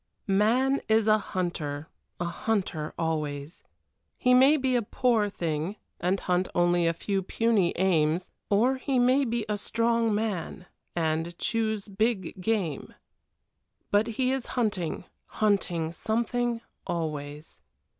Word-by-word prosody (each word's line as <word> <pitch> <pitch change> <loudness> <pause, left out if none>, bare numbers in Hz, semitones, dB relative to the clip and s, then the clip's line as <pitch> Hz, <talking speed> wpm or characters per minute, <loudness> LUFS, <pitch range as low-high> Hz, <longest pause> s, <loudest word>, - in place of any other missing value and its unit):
X - - -20
Man 240 +8 +3
is 220 0 +4
a 215 0 +5
hunter 160 -7 -3 0.3
a 175 - -1
hunter 175 -4 -2
always. 155 -2 -3 0.6
He 250 - +3
may 270 +4 +6
be 260 -2 +1
a 240 - +3
poor 225 -1 +1
thing 165 0 -2 0.2
and 185 +2 +1
hunt 180 +1 0
only 175 -1 +3
a 165 - +2
few 195 +3 -1
puny 205 -2 +2
aims, 170 -1 +1 0.2
or 240 +6 +3
he 260 0 -1
may 255 +3 +4
be 230 -2 -1
a 210 -1 -1
strong 230 0 +1
man 200 -4 -3 0.3
and 165 +1 -1
choose 220 -2 -1
big 200 -2 -1
game. 185 -9 -1 1.0
But 205 +2 +3
he 260 -1 +2
is 265 -2 -2
hunting, 200 -10 -1 0.2
hunting 180 -6 0
something 235 +4 -1 0.3
always. 150 -2 -4
200 Hz, 130 wpm, -27 LUFS, 170-230 Hz, 1.0 s, may